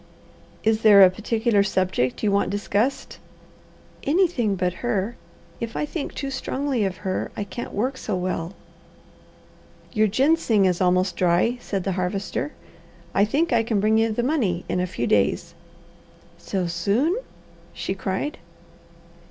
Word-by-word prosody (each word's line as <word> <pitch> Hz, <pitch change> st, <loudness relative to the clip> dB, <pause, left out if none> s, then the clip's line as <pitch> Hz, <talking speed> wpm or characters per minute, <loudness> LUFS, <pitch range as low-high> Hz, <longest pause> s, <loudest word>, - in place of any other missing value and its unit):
"Is 220 Hz, 0 st, +2 dB
there 205 Hz, -3 st, +8 dB
a 185 Hz, -, +7 dB
particular 220 Hz, +2 st, +1 dB
subject 185 Hz, -, 0 dB
you 210 Hz, -, +3 dB
want 200 Hz, 0 st, +2 dB
discussed?" 210 Hz, +5 st, -1 dB, 0.8 s
"Anything 285 Hz, -, +2 dB
but 180 Hz, -1 st, 0 dB
her. 235 Hz, -1 st, -1 dB, 0.4 s
If 230 Hz, -1 st, -5 dB
I -, -, 0 dB
think 295 Hz, 0 st, -5 dB
too 275 Hz, -1 st, -4 dB
strongly 265 Hz, -2 st, -1 dB
of 190 Hz, -2 st, -3 dB
her, 185 Hz, -, -1 dB
I -, -, -1 dB
can't 235 Hz, +4 st, -7 dB
work 255 Hz, +6 st, -1 dB
so 210 Hz, -, -3 dB
well." 180 Hz, -1 st, -3 dB, 1.4 s
"Your 215 Hz, -1 st, +3 dB
ginseng 245 Hz, -3 st, +3 dB
is 180 Hz, -1 st, +1 dB
almost 185 Hz, +1 st, +2 dB
dry," 185 Hz, +8 st, +2 dB
said 195 Hz, -5 st, -3 dB
the 195 Hz, -, -1 dB
Harvester. 185 Hz, -5 st, -2 dB, 0.6 s
"I 200 Hz, -, +4 dB
think 290 Hz, +7 st, 0 dB
I 230 Hz, -, +4 dB
can 220 Hz, -2 st, 0 dB
bring 215 Hz, +2 st, +3 dB
you 225 Hz, 0 st, +2 dB
the 235 Hz, +3 st, -1 dB
money 230 Hz, -, 0 dB
in -, -, -1 dB
a 180 Hz, -, 0 dB
few 120 Hz, -9 st, -3 dB
days." 100 Hz, -4 st, +1 dB, 0.9 s
"So 190 Hz, -2 st, -2 dB
soon!" 200 Hz, -, +1 dB, 0.6 s
she -, -, -3 dB
cried. 195 Hz, +10 st, -3 dB
205 Hz, 145 wpm, -24 LUFS, 185-240 Hz, 1.4 s, there